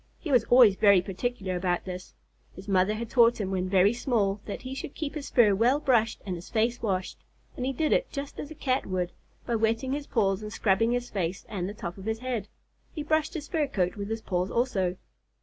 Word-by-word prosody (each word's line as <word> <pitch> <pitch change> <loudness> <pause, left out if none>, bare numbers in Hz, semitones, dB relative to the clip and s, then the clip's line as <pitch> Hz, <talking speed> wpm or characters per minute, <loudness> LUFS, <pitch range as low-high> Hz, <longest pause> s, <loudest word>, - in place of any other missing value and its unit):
He 310 - -5
was 245 -4 +4
always 240 -5 +7
very 200 -3 +6
particular 195 +1 -3
about 180 -1 -1
this. 180 -1 -7 0.4
His 190 +2 -11
mother 195 +1 +2
had 230 +2 -4
taught 235 0 +4
him 195 -2 -2
when 185 -1 -1
very 195 +3 +4
small 215 -5 0
that 205 - -5
he 255 - -6
must 270 +1 -6
keep 300 -3 -4
his 300 -3 -6
fur 220 -5 +5
well 240 +8 +3
brushed 235 -6 +1
and 185 -3 -3
his 170 +1 -10
face 230 +1 0
washed, 190 -4 -2 0.4
and 250 - -3
he - - +1
did 305 +4 +1
it - - +1
just 280 -1 -6
as 290 - -5
a 315 - -9
Cat 265 -2 -1
would, 180 -2 -1 0.3
by 240 - -2
wetting 225 +4 0
his 285 +1 -3
paws 195 -4 +1
and 210 0 -6
scrubbing 220 +2 +2
his 245 0 -2
face 185 0 -3
and 185 -3 -3
the 205 - -7
top 175 -1 -6
of 190 - -9
his 220 0 -1
head. 240 -4 -3 0.4
He 305 - -5
brushed 310 +1 0
his 300 -3 -5
fur 315 -5 0
coat 180 -7 -1
with 200 -1 -5
his 225 0 -3
paws 180 0 -1
also. 195 -7 0
220 Hz, 230 wpm, -28 LUFS, 190-255 Hz, 0.4 s, always